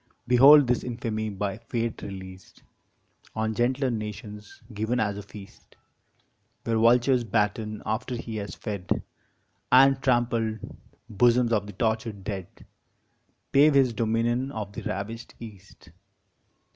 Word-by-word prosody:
Behold 135 +4 +7
this 125 0 0
infamy 115 -3 -3
by 100 +1 -4
Fate 115 0 -3
released 95 -1 -10 0.7
On 110 0 -1
gentler 125 +4 0
nations 105 -1 -7
given 110 +4 -1
as 105 -3 0
a 100 - -6
feast 100 -1 -14 0.9
Where 115 -1 0
vultures 120 +2 +4
batten 105 0 -1
after 120 +3 -2
he 115 -2 -6
has 100 -1 -6
fed, 100 -5 -3 0.7
And 135 +1 +6
trampled 120 -3 +1 0.5
bosoms 120 +2 +3
of 100 -2 0
the 105 - -9
tortured 110 -1 -2
dead 95 -3 -5 1.0
Pave 145 +1 +5
his 130 -3 +4
dominion 115 +4 0
of 105 -4 -6
the - - -6
ravished 110 +5 -6
East. 95 -5 -13
110 Hz, 120 wpm, -26 LUFS, 105-120 Hz, 1.0 s, Behold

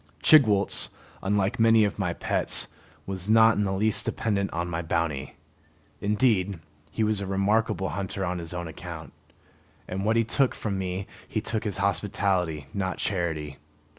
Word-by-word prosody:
Chigwooltz, 110 -10 +5 0.3
unlike 100 +3 0
many 115 -1 +6
of 105 - -3
my 90 -3 0
pets, - - +1 0.4
was 95 0 -4
not 110 0 +6
in 105 - +1
the 95 - -1
least 105 +2 +1
dependent 100 -3 -1
on 85 +1 -2
my 85 -1 -3
bounty. 80 -4 -2 0.6
Indeed, 100 -3 +1 0.3
he 110 - -1
was 105 -2 +1
a 100 - -4
remarkable 100 +1 +1
hunter 95 -1 -3
on 90 0 -2
his 85 -1 -6
own 85 -1 -4
account, 80 - -8 0.7
and 95 +1 -3
what 110 +2 +2
he 115 - +4
took 125 +4 +1
from 100 -3 -3
me 95 +1 -3 0.2
he 110 - -2
took 110 0 -2
as 100 - -2
hospitality, 95 -5 0
not 95 -2 -2
charity. 80 -7 -2
100 Hz, 160 wpm, -26 LUFS, 90-105 Hz, 0.7 s, many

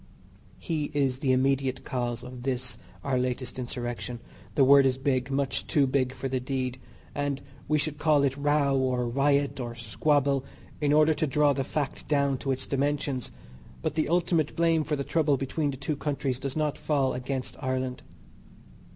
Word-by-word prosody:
He 160 -4 -2
is 135 -3 +1
the 135 -3 +1
immediate 130 0 +1
cause 120 -2 -2
of 125 0 -8
this 130 -1 -2 0.2
our 130 -2 +1
latest 125 0 -2
Insurrection 120 -1 -4 0.4
the 140 - +5
word 140 0 +7
is 130 -1 +1
big, 130 -2 0
much 135 -1 -1
too 145 -2 +3
big 130 -1 +1
for 135 +1 -3
the 130 -1 -1
deed, 130 0 -3 0.3
and 145 -1 -1 0.3
we 155 - +3
should 150 0 -2
call 150 -2 +4
it 135 -1 +1
row, 145 -1 +2
or 130 -2 +1
riot, 140 +3 +2
or 120 -2 -4
squabble, 140 +4 +1 0.4
in 145 -1 +2
order 155 +1 +5
to 155 0 0
draw 145 +1 +3
the 135 0 -1
fact 145 +1 -3
down 140 -3 +2
to 135 - -1
its 130 0 -2
dimensions, 140 -2 -1 0.5
but - - 0
the 155 0 0
ultimate 170 -3 +1
blame 165 -1 +3
for 150 0 -1
the 140 - -2
trouble 150 -2 +2
between 145 +3 -1
the 135 - -4
two 140 +3 -2
countries 140 -3 -2
does 135 +2 -4
not 150 -2 0
fall 140 -4 +1
against 130 0 -3
Ireland. 130 -1 -2
135 Hz, 175 wpm, -28 LUFS, 130-145 Hz, 0.5 s, word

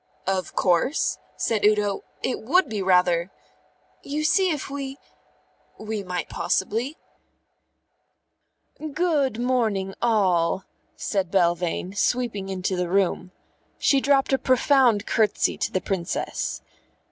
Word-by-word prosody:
"Of 190 -1 -2
course," 185 - +1 0.2
said 220 -3 0
Udo. 210 -1 +2 0.2
"It 255 - -1
would 315 +9 +3
be 215 -4 -3
rather 180 -2 +3 0.4
" - - -38
"You 305 +1 -1
see 375 +4 +3
if 300 -5 -2
we 275 -1 -5 0.4
" - - -38
"We 220 -2 -2
might 180 -4 -4
possibly 230 +10 -1 0.9
" 310 -2 -15
"Good 300 -8 +1
morning, 220 -6 0
all!" 190 -6 +2 0.3
said 195 -4 -2
Belvane, 175 0 0
sweeping 215 -4 0
into 185 0 -2
the 180 -1 -2
room. 185 -1 +1 0.5
She 275 -1 +3
dropped 275 0 +2
a 265 - +3
profound 255 -4 +3
curtsey 215 -3 +1
to - - -1
the 185 - -1
Princess. 180 -2 -3
210 Hz, 125 wpm, -24 LUFS, 185-265 Hz, 0.9 s, would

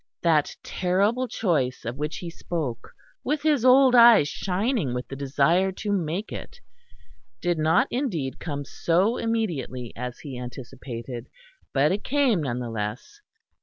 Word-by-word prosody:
That 155 -4 +2
terrible 200 +8 +1
choice 150 - -1
of 115 +2 -3
which 150 +3 -3
he 175 -2 -6
spoke, 145 -10 -4 0.3
with 295 +1 -1
his 295 -6 +2
old 255 0 +6
eyes 235 -10 +8
shining 190 - -1
with 125 - -4
the 135 - -6
desire 145 +7 +2
to 205 +2 -4
make 185 +1 -2
it, - - -8 0.8
did 175 +2 0
not 160 - +3
indeed 185 - -2
come 145 -3 -4
so 185 - +1
immediately 170 - -2
as 125 0 -5
he 135 -4 -7
anticipated; 120 -1 -7 0.4
but 145 +2 +3
it 200 +2 -2
came 265 - +2
none 125 -5 -2
the 120 -2 -4
less. 110 - -5
165 Hz, 145 wpm, -25 LUFS, -, 0.8 s, eyes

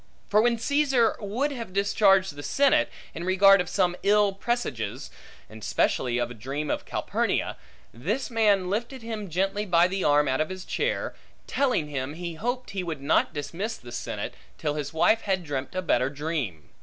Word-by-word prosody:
For 210 +1 +5
when 235 0 +2
Caesar 265 -2 +2
would 230 +8 -1
have 230 -8 -6
discharged 195 -2 +3
the 145 - -7
senate, 275 - +3 0.2
in 170 - -6
regard 195 +1 +6
of 180 - -5
some 180 -3 +1
ill 205 0 +4
presages, 130 - -3 0.4
and 110 0 -12
specially 120 +3 +1
a 120 - +1
dream 135 +6 -4
of - - -2
Calpurnia; - - -1 0.4
this 205 - -2
man 205 -5 +3
lifted 235 +6 -3
him 220 -4 -5
gently 195 +5 0
by 175 -3 +4
the 190 +1 -2
arm 145 0 +4
out 130 +2 +1
of 155 - -1
his 185 0 -7
chair, - - -1 0.3
telling 255 - +1
him 140 0 -4
he 170 0 -5
hoped 245 +5 -3
he 195 -2 -2
would 160 -5 -5
not 140 - +3
dismiss 170 +10 -4
the 120 - -12
senate, - - -4 0.2
till 145 - -1
his 145 -2 -4
wife 220 +8 +3
had 190 -3 -1
dreamt 145 +1 -4
a 185 - -1
better 130 -6 +2
dream. 140 - -4
185 Hz, 180 wpm, -26 LUFS, 145-215 Hz, 0.4 s, regard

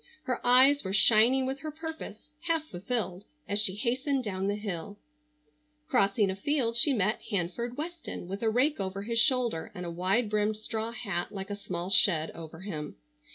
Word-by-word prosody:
Her 255 -4 -3
eyes 260 +4 +6
were 190 - -4
shining 235 +5 +5
with 265 +1 -3
her 310 - -5
purpose, 315 -8 -7 0.3
half 325 -2 +1
fulfilled, 195 - -3 0.2
as 205 +1 +2
she 190 -3 +1
hastened 260 +4 -1
down 190 -3 -2
the 205 - 0
hill. 205 -1 -5 0.9
Crossing 200 -8 +2
a - - -4
field 235 +2 0
she 235 +5 +6
met 215 -4 0
Hanford 225 +5 -3
Weston 325 - -6
with 195 +2 -5
a 225 - +2
rake 255 +6 +1
over 195 0 -3
his 230 +2 0
shoulder 240 -9 +2
and 180 - -6
a 170 - -4
wide 190 +7 +1
brimmed 210 0 0
straw 220 +1 -4
hat 200 -7 -3
like 195 0 -6
a - - -2
small 185 -2 -5
shed 185 -4 +4
over 160 0 -10
him. 155 -7 -6
215 Hz, 180 wpm, -29 LUFS, 190-255 Hz, 0.9 s, eyes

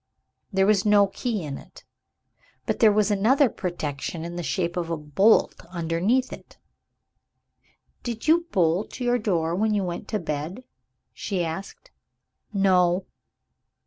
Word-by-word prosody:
There 190 -1 +3
was 205 -1 +3
no 205 -1 +5
key 210 0 -3
in 140 -3 -5
it, - - -16 0.8
but - - -1
there 220 -2 +6
was 210 0 +2
another 245 +7 +4
protection 165 -3 -4
in 170 0 -6
the 175 - -3
shape 170 0 -2
of 170 -2 -2
a 165 - -1
bolt 150 +9 +2
underneath. 180 +9 0 1.7
"Did 235 +2 -5
you 335 +2 +4
bolt 180 +5 0
your 245 0 +1
door 170 -6 0
when 210 +4 +1
you 200 - +1
went 175 -2 -5
to 215 - -1
bed?" 160 - -4 0.5
she 185 -4 -2
asked. 195 - -7 0.6
"No." 185 -2 +3
190 Hz, 135 wpm, -25 LUFS, 170-215 Hz, 1.7 s, there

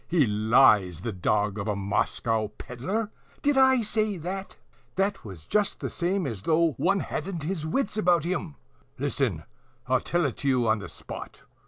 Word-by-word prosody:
he 165 -5 +3
lies, 105 -5 +4
the 115 - -3
dog 105 +2 0
of 100 - -3
a 105 - 0
Moscow 110 +2 0
pedler! 195 - -3 0.3
Did 290 0 +3
I 265 -2 +5
say 215 -1 0
that? 190 +4 -5 0.4
'TWAS 190 - -2
JUST 210 -1 0
THE - - -4
SAME 180 +1 -1
AS 110 -8 -4
THOUGH 165 +7 +3
ONE 195 +1 +2
HADN'T 180 -5 -4
HIS 160 -1 -3
WITS 210 +5 -1
ABOUT 175 -5 +3
HIM. 170 - -3 0.4
Listen. - - -1 0.4
I'll 130 0 +2
tell 175 +4 0
it 135 - -2
to 140 - -4
you 125 -3 +3
on 110 -1 +3
the 100 - -8
spot." - - -9
155 Hz, 170 wpm, -27 LUFS, -, 0.4 s, I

